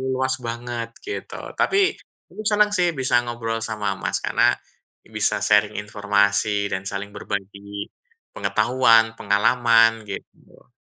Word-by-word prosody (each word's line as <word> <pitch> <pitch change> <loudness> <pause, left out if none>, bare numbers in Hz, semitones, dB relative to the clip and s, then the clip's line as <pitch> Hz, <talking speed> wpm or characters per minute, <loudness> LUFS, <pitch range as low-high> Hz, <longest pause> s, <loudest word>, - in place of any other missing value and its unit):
luas 130 +1 0
banget, 120 0 -5
gitu. 410 - -6 0.2
Tapi 390 0 +2 0.3
aku - - -8
senang, 210 -1 +4
sih, 175 -2 +2
bisa 130 -3 +2
ngobrol 115 -1 -3
sama 105 -3 -3
Mas - - -2
karena - - +3 0.5
bisa - - 0
sharing 105 0 +3
informasi 100 0 +1
dan 95 +1 -3
saling 100 +1 -4
berbagi 100 0 -6 0.4
pengetahuan, 115 -3 +3
pengalaman, 115 +1 +3
gitu. 100 - -11
115 Hz, 115 wpm, -22 LUFS, 100-120 Hz, 0.5 s, senang